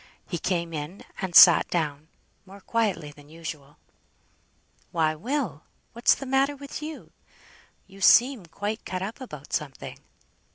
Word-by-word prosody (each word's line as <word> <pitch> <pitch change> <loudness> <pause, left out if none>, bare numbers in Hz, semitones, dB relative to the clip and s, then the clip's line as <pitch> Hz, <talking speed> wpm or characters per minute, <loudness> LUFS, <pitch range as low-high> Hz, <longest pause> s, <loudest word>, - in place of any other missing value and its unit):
He 175 - -4
came 170 -2 -2
in, 155 +5 -6 0.2
and 185 -3 -4
sat - - +9
down, 155 -3 -2 0.4
more 195 +1 -13
quietly 200 -8 -1
than 145 0 -17
usual. 155 -3 -9 1.1
"Why, 160 -2 +1
Will! 200 - -3 0.3
what's 235 +1 +3
the 275 - -8
matter 270 +2 +1
with 280 +1 -8
you? 310 0 -8 0.7
You 195 +1 -16
seem 240 -3 +5
quite 205 +6 -4
cut 185 0 -4
up 220 +7 -6
about 150 - -10
something!" 140 -4 -4
185 Hz, 135 wpm, -26 LUFS, 155-235 Hz, 1.1 s, sat